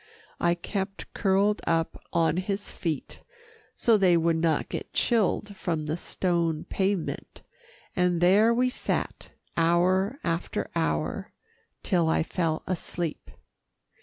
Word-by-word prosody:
I 170 Hz, 0 st, +3 dB
kept 195 Hz, +2 st, -5 dB
curled 200 Hz, +1 st, +2 dB
up 165 Hz, -1 st, +1 dB, 0.2 s
on 165 Hz, 0 st, +2 dB
his 195 Hz, +2 st, -2 dB
feet, 160 Hz, -5 st, -4 dB, 0.6 s
so 230 Hz, -2 st, +4 dB
they 185 Hz, -4 st, +5 dB
would 165 Hz, 0 st, +2 dB
not 160 Hz, -2 st, +1 dB
get -, -, -6 dB
chilled 210 Hz, -2 st, +1 dB
from 165 Hz, -5 st, -2 dB
the 155 Hz, +1 st, -1 dB
stone 170 Hz, -3 st, -1 dB
pavement, 190 Hz, -3 st, -2 dB, 0.5 s
and 180 Hz, -1 st, +2 dB
there 200 Hz, +6 st, +5 dB
we 250 Hz, +2 st, +3 dB
sat, 250 Hz, -, -3 dB, 0.3 s
hour 185 Hz, +7 st, +2 dB
after 165 Hz, 0 st, -2 dB
hour, 75 Hz, -1 st, -1 dB, 0.5 s
till 170 Hz, -3 st, +2 dB
I 160 Hz, -, +2 dB
fell 165 Hz, -2 st, -1 dB
asleep. 175 Hz, -2 st, -4 dB
175 Hz, 120 wpm, -27 LUFS, 165-195 Hz, 0.6 s, they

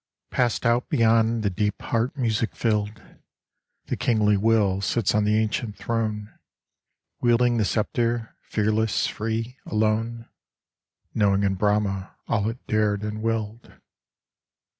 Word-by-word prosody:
Passed 125 Hz, -1 st, 0 dB
out 120 Hz, +1 st, +2 dB
beyond 115 Hz, 0 st, +3 dB
the 100 Hz, -, +1 dB
deep 105 Hz, +3 st, -1 dB
heart 115 Hz, +4 st, -1 dB
music 115 Hz, -3 st, 0 dB
filled, 105 Hz, -2 st, -1 dB, 0.8 s
The -, -, -2 dB
kingly 105 Hz, -3 st, +2 dB
Will 100 Hz, -2 st, +2 dB
sits 100 Hz, +2 st, +1 dB
on 105 Hz, -1 st, +2 dB
the 105 Hz, +1 st, +3 dB
ancient 110 Hz, 0 st, -1 dB
throne, 110 Hz, -2 st, -2 dB, 0.9 s
Wielding 120 Hz, 0 st, +3 dB
the 110 Hz, -, +2 dB
sceptre, 115 Hz, +2 st, -1 dB
fearless, 110 Hz, 0 st, 0 dB
free, 115 Hz, +4 st, -3 dB
alone, 110 Hz, +2 st, -1 dB, 0.9 s
Knowing 100 Hz, -2 st, +2 dB
in 100 Hz, -1 st, +2 dB
Brahma 100 Hz, -1 st, 0 dB
all 105 Hz, -1 st, +1 dB
it 115 Hz, +2 st, -8 dB
dared 105 Hz, -1 st, +1 dB
and 105 Hz, 0 st, -4 dB
willed. 115 Hz, 0 st, -3 dB
110 Hz, 120 wpm, -25 LUFS, 105-115 Hz, 0.9 s, beyond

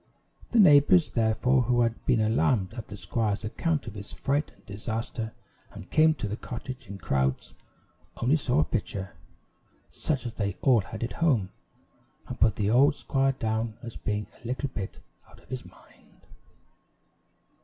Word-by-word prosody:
The 240 Hz, -, +1 dB
neighbors, 155 Hz, -1 st, +6 dB
therefore, 115 Hz, +3 st, +2 dB
who 120 Hz, 0 st, +2 dB
had 115 Hz, -1 st, 0 dB
been 125 Hz, -4 st, +4 dB
alarmed 110 Hz, -2 st, +2 dB
at 115 Hz, -2 st, -7 dB
the 105 Hz, -, -8 dB
squire's 105 Hz, -1 st, -1 dB
account 145 Hz, +8 st, -1 dB
of 110 Hz, -, -7 dB
his 100 Hz, -1 st, -8 dB
fright 145 Hz, +2 st, -1 dB
and -, -, -27 dB
disaster, 110 Hz, +2 st, -4 dB, 0.4 s
and 90 Hz, -, -11 dB
came 155 Hz, 0 st, +5 dB
to 115 Hz, -, -3 dB
the 105 Hz, -, -3 dB
cottage 125 Hz, +1 st, -7 dB
in 100 Hz, +1 st, -7 dB
crowds, 65 Hz, -7 st, -1 dB, 0.6 s
only 125 Hz, +6 st, +3 dB
saw 140 Hz, -1 st, +2 dB
a -, -, +3 dB
pitcher, 100 Hz, -6 st, -3 dB, 0.8 s
such 140 Hz, -5 st, -2 dB
as 120 Hz, -, -4 dB
they 100 Hz, -3 st, -2 dB
all 125 Hz, -5 st, +5 dB
had 110 Hz, +4 st, -7 dB
at 120 Hz, -, -3 dB
home, 130 Hz, -, +2 dB, 0.8 s
and -, -, -7 dB
put 110 Hz, -3 st, +4 dB
the 105 Hz, 0 st, 0 dB
old 140 Hz, +4 st, +5 dB
squire 135 Hz, -1 st, +1 dB
down 110 Hz, -2 st, -2 dB
as 115 Hz, -1 st, -7 dB
being 105 Hz, -1 st, -2 dB, 0.2 s
a -, -, -7 dB
little 130 Hz, +3 st, -2 dB
bit 100 Hz, -7 st, -6 dB, 0.3 s
out -, -, -17 dB
of -, -, -24 dB
his 130 Hz, -1 st, -5 dB
mind. -, -, -20 dB
115 Hz, 165 wpm, -28 LUFS, 105-135 Hz, 0.8 s, neighbors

